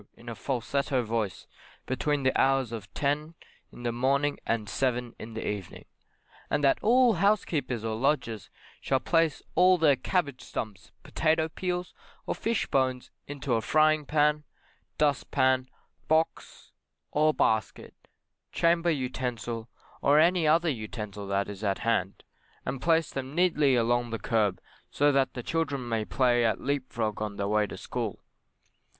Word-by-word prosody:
in 120 - -16
a 120 - -4
falsetto 135 +2 -1
voice, 110 -5 -3 0.4
between 140 +2 -1
the 130 - +2
hours 135 -3 +2
of 110 -4 -7
10 150 +3 -1 0.4
in 120 - -11
the 120 - 0
morning 140 +4 +1
and 115 -2 -1
7 125 -1 -1
in 110 +1 -8
the 115 - -4
evening; 100 -3 -5 0.6
and 145 - 0
that 135 - +4
all 245 +1 +5
housekeepers 165 - 0
or 110 -1 -1
lodgers 120 -4 -1 0.3
shall 135 - 0
place 165 +3 +1
all 185 +1 +5
their 155 -4 +4
cabbage 140 -3 -1
stumps, 110 +1 -6
potatoe 160 0 +1
peels, 180 +2 -3 0.3
or - - -1
fish 230 -1 -1
bones 130 -2 0 0.2
into 140 -2 -3
a 115 - +2
frying 155 +3 +3
pan, 150 +1 +2 0.5
dustpan, 130 -3 +2 0.4
box 160 +1 -1 0.4
or 155 +1 +3
basket, 110 -7 0 0.6
chamber 170 0 +2
utensil, 125 -5 -3 0.3
or 145 +2 +4
any 170 +1 +4
other 165 +3 +4
utensil 105 -5 -5
that 100 0 0
is 100 0 -8
at 100 -2 +1
hand, 100 -4 0 0.4
and 130 +1 -4
place 165 -1 +2
them 135 +1 -5
neatly 155 -6 +3
along 120 0 +1
the 115 - -3
kerb, 110 -6 0 0.3
so 145 +1 +3
that 135 -1 +2
children 140 -6 -2
may 115 -2 -1
play 120 +5 +2
at 110 -3 +1
leap 140 -1 -2
frog 110 -2 -2
on 105 -1 -3
their 100 0 -2
way 105 0 +2
to - - -8
school. - - -4
130 Hz, 150 wpm, -28 LUFS, 115-150 Hz, 0.6 s, all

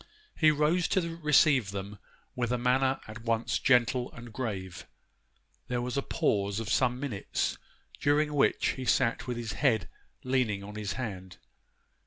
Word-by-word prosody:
He 155 - +5
rose 155 +4 +2
to 170 -3 -1
receive 145 - +4
them 100 0 -6 0.4
with 120 -1 -1
a 125 - +1
manner 130 +2 +2
at 110 +1 -9
once 115 0 0
gentle 125 -1 +2
and 115 -2 -11
grave. 100 -7 -5 0.8
There 125 -1 -1
was 125 0 -3
a 140 - +1
pause 100 -5 0
of 110 -2 -4
some 125 -1 +2
minutes, 130 -8 -2 0.4
during 150 +1 +2
which 145 - +2
he 130 - -4
sat 115 0 +1
with 125 -1 -3
his 115 -2 -4
head 115 -9 +1 0.4
leaning 125 -6 0
upon 105 +1 -8
his 105 -1 -3
hand. 95 -8 -6
125 Hz, 155 wpm, -29 LUFS, 105-135 Hz, 0.8 s, He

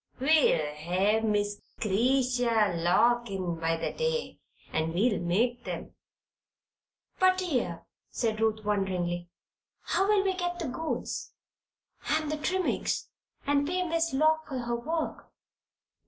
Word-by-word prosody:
We'll 275 - +4
hev 185 +8 +1
Miss 205 -1 0 0.2
'Cretia 235 -1 +2
Lock 240 +7 +3
in 180 -4 -3
by 165 0 0
the - - -3
day, 480 0 -2 0.3
and 160 +1 -1
we'll 210 +2 +2
make 235 +8 0
'em." - - -5 1.3
"But, 370 0 +5
dear," 255 - -2 0.2
said 220 -2 -1
Ruth, 220 -1 +1
wonderingly, 180 -4 -1 0.5
"how 390 - +1
will 415 -2 +4
we 380 - +2
get 355 -1 -2
the 330 -6 -3
goods 320 +5 -4 0.8
and 310 -1 +1
the 305 - -1
trimmings 370 +5 -1 0.4
and 285 0 +2
pay 365 +2 0
Miss 330 0 +1
Lock 315 +3 +2
for 270 -3 -4
her 240 -1 -2
work?" 315 +7 -3
240 Hz, 125 wpm, -29 LUFS, 195-315 Hz, 1.3 s, But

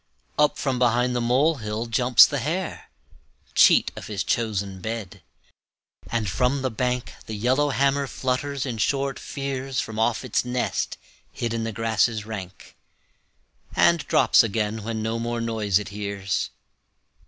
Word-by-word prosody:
Up 150 0 +3
from 130 -3 -1
behind 125 0 +2
the 120 - 0
molehill 120 -3 +1
jumps 120 +1 +6
the 145 - -2
hare, 165 +8 -3 0.6
Cheat - - +5
of - - -8
his 105 -2 -2
chosen 100 -4 -2
bed, 110 -3 -5 0.9
and 115 -3 -1
from 125 +8 0
the 130 - 0
bank 125 +2 -2
The 110 - -4
yellowhammer 140 +4 +1
flutters 135 +2 -2
in 120 -4 -4
short 135 +3 0
fears 135 -2 -4
From 110 0 -4
off 115 +2 +1
its 125 - 0
nest 125 0 -2 0.3
hid 115 -1 -3
in 115 -1 -2
the 115 - -2
grasses 110 0 0
rank, 95 -5 -8 1.0
And 170 0 +5
drops - - +5
again 110 -1 -1
when 110 0 -3
no 115 +1 -1
more 120 0 -2
noise 110 -4 +1
it 105 -2 -4
hears. 100 -1 -3
115 Hz, 140 wpm, -24 LUFS, 110-130 Hz, 1.0 s, jumps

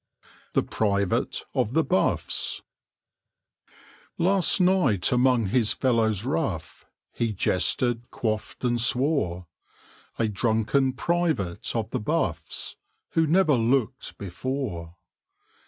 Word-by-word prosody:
THE - - +2
PRIVATE 100 -3 0
OF 110 - 0
THE 160 +2 +3
BUFFS 115 -8 0 1.5
Last 190 +2 +4
night 180 - +3
among 125 -4 +3
his 115 -1 +2
fellows 110 -5 +1
rough 130 - -3 0.2
He 115 -2 -1
jested, 120 +4 0
quaffed, 110 +1 -3
and 120 -1 +1
swore: 125 - +1 0.7
A 115 - +1
drunken 110 +5 +1
private 140 - -1
of 110 -1 -2
the - - -1
Buffs, 105 - -2 0.3
Who 160 -1 +2
never 165 -1 +4
looked 125 +1 0
before. 95 -4 -5
120 Hz, 100 wpm, -25 LUFS, 105-140 Hz, 1.5 s, Last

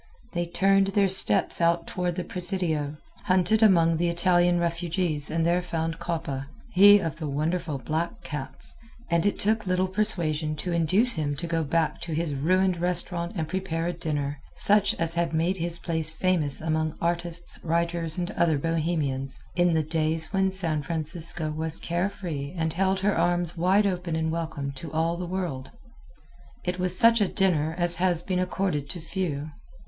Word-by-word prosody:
They 175 -1 -2
turned 195 +2 +2
their 195 0 +2
steps 190 -1 +6
out 170 0 +2
toward 180 -1 -3
the 180 - -3
Presidio, 175 -6 0 0.3
hunted 190 +3 +2
among 165 -6 +4
the 175 +1 0
Italian 175 0 +2
refugees 170 -3 0
and 165 +1 -1
there 175 +1 +2
found 165 -2 -4
Coppa 145 -5 -4 0.2
he 205 +2 +7
of 165 -7 -4
the 160 -2 -5
wonderful 155 +2 -2
black 160 +6 -4
cats, 135 -3 -7 0.4
and 170 +3 +2
it 205 - -1
took 215 0 0
little 185 +1 +1
persuasion 170 -7 0
to 175 +4 -4
induce 185 +9 +2
him 145 -3 -2
to 150 - -4
go 165 -1 -1
back 160 +2 -1
to 165 -3 -4
his 160 -2 -2
ruined 185 +6 +1
restaurant 175 0 0
and 160 -4 -3
prepare 170 -2 -3
a 175 - -2
dinner, 150 -4 -4 0.2
such 205 -1 +4
as 165 0 0
had 170 -1 -1
made 170 +4 0
his 170 0 -1
place 160 -2 0
famous 160 -4 -1
among 155 0 -1
artists, 170 0 0
writers, 170 0 -1
and 180 +2 -3
other 165 -6 +1
Bohemians, 150 -4 -2 0.2
in 175 -1 +2
the 160 - +1
days 160 +2 -1
when 190 0 +2
San 170 -5 0
Francisco 160 +1 -1
was 160 +1 -1
care 175 +3 -2
free 160 -5 -6
and 160 -1 -1
held 190 +2 0
her 205 +1 +1
arms 175 0 0
wide 185 +5 +2
open 180 -4 -2
in 160 0 -1
welcome 160 -4 -4
to 140 +3 -9
all 165 +2 0
the 175 0 -5
world. 170 -8 -4 1.0
It 180 0 -2
was 180 0 +1
such 230 +1 +6
a 200 - +3
dinner 160 -6 0
as 175 -1 +2
has 175 -2 0
been 185 -2 -2
accorded 180 -6 -2
to 175 - -3
few. 155 -3 -4
170 Hz, 175 wpm, -26 LUFS, 160-180 Hz, 1.0 s, he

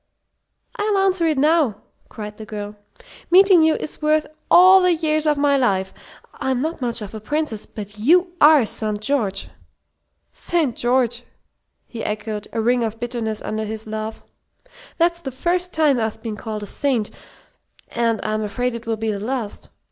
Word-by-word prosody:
"I'll 415 -1 +1
answer 380 -3 +2
it 310 -3 +1
now!" 300 -5 +3 0.3
cried 210 0 -8
the - - -6
girl. 210 -1 -6 0.5
"Meeting 375 -1 +6
you 315 0 +4
is 310 - -6
worth 305 0 +2 0.2
all 370 +2 +8
the 360 -1 +3
years 310 -1 0
of 300 -1 +2
my 285 0 +3
life! 190 -7 0 0.4
I'm 260 -2 -2
not 315 +2 -3
much 235 -2 -2
of 205 - -9
a 220 - -6
princess, 290 -1 -3
but 205 -1 -9
you 350 - +3 0.2
are 300 -7 +5
St. 215 0 -1
George." 215 -5 -1 0.8
"St. 315 -9 0
George!" 245 -1 +1 0.6
he 230 - -7
echoed, 210 0 -4
a 225 - -3
ring 240 +1 +2
of 225 0 -4
bitterness 235 -3 -3
under 215 0 -3
his 220 0 -5
laugh. 220 0 -5 0.7
"That's 340 0 +2
the 270 - -5
first 350 +7 -1
time 300 -5 +2
I've 220 -1 -2
been 225 -2 -4
called 215 0 -6
a - - -4
saint, 240 -1 -1 0.8
and 230 -2 0
I'm 215 0 -1
afraid 245 +4 -2
it 235 -1 -8
will 225 -1 -1
be 220 0 -1
the 200 - -4
last. 230 -1 -4
240 Hz, 170 wpm, -21 LUFS, 215-310 Hz, 0.8 s, all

